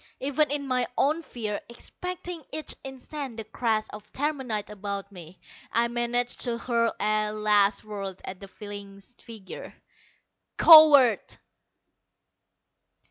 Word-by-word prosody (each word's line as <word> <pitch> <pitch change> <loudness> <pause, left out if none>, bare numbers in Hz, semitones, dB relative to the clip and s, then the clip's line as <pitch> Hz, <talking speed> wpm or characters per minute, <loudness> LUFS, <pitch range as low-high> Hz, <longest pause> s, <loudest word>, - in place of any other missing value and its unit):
Even 285 +2 +1
in 285 -1 -2
my 250 -1 +1
own 305 +4 +2
fear, 220 -9 -5
expecting 360 +6 -7
each 310 0 -4
instant 265 -1 -7
the 225 - -4
crash 220 0 -1
of 210 0 -11
terminite 265 -8 -2
about 200 -1 -5
me, 175 -1 -11 0.3
I 235 +1 +2
managed 240 +1 0
to 240 -2 -1
hurl 235 -1 0
a 215 0 +1
last 210 -1 +2
word 195 -3 -6
at 185 -1 -7
the 195 - -9
fleeing 200 -1 -9
figure. 220 -2 -11 0.8
"Coward!" 290 -8 +7
230 Hz, 120 wpm, -26 LUFS, 205-270 Hz, 0.8 s, Coward